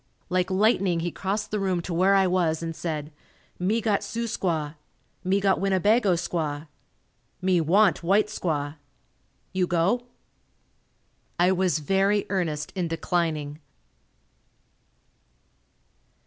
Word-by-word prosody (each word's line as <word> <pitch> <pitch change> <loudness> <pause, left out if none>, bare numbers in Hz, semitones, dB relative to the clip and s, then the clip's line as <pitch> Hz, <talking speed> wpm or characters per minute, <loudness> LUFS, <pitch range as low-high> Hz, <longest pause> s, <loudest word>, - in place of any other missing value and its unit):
Like 180 0 +1
lightning 190 -3 +2
he 175 +1 -2
crossed 200 +4 -3
the 210 - 0
room 190 -3 0
to 170 - -5
where 190 +4 +4
I 195 -1 +4
was 170 -3 +1
and 165 -1 -4
said, 155 -3 -4 0.5
"Me 210 +6 +1
got 210 -2 +1
Sioux 235 +1 -3
squaw. 160 -9 -2 0.5
Me 190 +2 +2
got 195 -1 +2
Winnebago 195 +2 +3
squaw. 160 -3 -3 0.7
Me 185 -1 +2
want 185 +2 +3
white 195 +5 +3
squaw. 155 -8 -3 0.8
You 185 -1 +1
go?" 190 +9 +1 1.3
I 180 +1 +5
was 185 -4 +1
very 195 +6 +1
earnest 155 -6 -2
in 180 -3 -1
declining. 160 -3 -2
180 Hz, 120 wpm, -26 LUFS, 165-195 Hz, 1.3 s, I